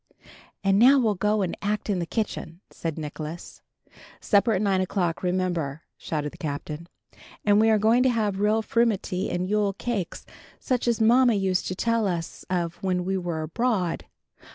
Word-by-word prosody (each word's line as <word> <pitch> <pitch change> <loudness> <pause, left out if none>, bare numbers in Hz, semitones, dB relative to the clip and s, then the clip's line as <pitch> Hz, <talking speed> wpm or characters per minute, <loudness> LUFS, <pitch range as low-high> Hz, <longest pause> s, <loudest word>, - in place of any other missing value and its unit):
"And 195 0 +3
now 265 +5 +7
we'll 225 -5 +2
go 210 +1 +1
and 180 - -2
act 210 +1 -2
in 200 -4 0
the 170 - -3
kitchen," 190 -5 -4
said 165 -2 -4
Nicholas. 155 +2 -7 0.6
"Supper 215 +2 +3
at 190 - 0
nine 195 -2 +2
o'clock, 180 -3 -1
remember," 175 -5 -1
shouted 150 -2 -3
the - - -16
Captain. 150 +2 -5 0.6
"And 205 0 +5
we 220 +1 +4
are 220 - +5
going 220 +4 +4
to 260 - +4
have 210 -5 0
real 215 +2 +2
frumenty 215 -5 0
and 180 +1 -2
Yule 205 0 +1
cakes, 205 -3 -4 0.3
such 250 -2 -1
as 235 -1 +2
mamma 240 +1 +5
used 190 -2 0
to 185 - -3
tell 230 +1 +1
us 170 -3 -4
of 175 -2 -1
when 180 -2 0
we 190 +1 0
were 175 -4 -2
abroad." 185 +1 -1
195 Hz, 175 wpm, -25 LUFS, 175-220 Hz, 0.6 s, now